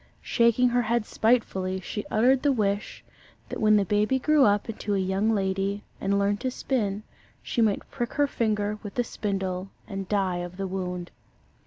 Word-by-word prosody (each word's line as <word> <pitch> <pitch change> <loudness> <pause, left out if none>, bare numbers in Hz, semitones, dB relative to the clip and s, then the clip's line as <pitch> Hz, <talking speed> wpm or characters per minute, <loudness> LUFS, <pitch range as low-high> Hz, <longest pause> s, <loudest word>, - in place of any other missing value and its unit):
Shaking 235 +1 +3
her 245 0 +2
head 235 -1 0
spitefully, 190 -6 +1
she 205 +3 -5
uttered 250 +4 +3
the 290 - +3
wish 205 -4 -1 0.4
that - - -5
when 215 0 +5
the 205 -1 +3
baby 210 +6 +2
grew 295 +1 +4
up 205 0 +2
into 210 -2 -2
a - - +1
young 190 +3 +1
lady, 195 -1 0 0.2
and 200 +1 +1
learned 200 0 +1
to 260 - -1
spin, 215 -6 -2 0.4
she 235 - -1
might 215 -3 +1
prick 240 -3 -3
her 290 - +3
finger 210 -5 -1
with 205 - -8
the 245 - +2
spindle 195 -4 -3 0.2
and 195 -3 -5
die 195 -4 +1
of 175 +1 -6
the 195 - -2
wound. 180 -2 -4
205 Hz, 180 wpm, -26 LUFS, 195-235 Hz, 0.4 s, when